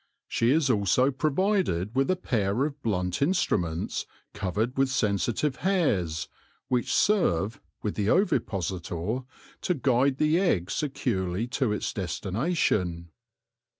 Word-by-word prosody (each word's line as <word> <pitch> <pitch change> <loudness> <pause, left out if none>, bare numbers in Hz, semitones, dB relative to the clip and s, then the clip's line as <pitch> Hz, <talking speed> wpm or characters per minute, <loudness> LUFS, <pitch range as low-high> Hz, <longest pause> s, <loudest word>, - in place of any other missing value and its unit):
She 115 - +1
is 150 +1 +3
also 115 +5 +3
provided 155 - 0
with 135 +4 +1
a 185 - +3
pair 115 - 0
of 145 -1 -5
blunt 90 -4 -1
instruments 90 - 0 0.3
covered 110 +7 -2
with 135 0 +2
sensitive 120 +4 0
hairs, 100 - 0 0.4
which 125 -2 0
serve, 120 - +2 0.2
with 105 - -1
the 105 0 -1
ovipositor, 95 - 0 0.4
to 180 - +1
guide 130 0 +2
the 155 +4 +3
egg 100 - +1
securely 105 -9 -1
to 130 -3 0
its 110 +1 -2
destination. 95 - -1
115 Hz, 115 wpm, -27 LUFS, 95-145 Hz, 0.4 s, is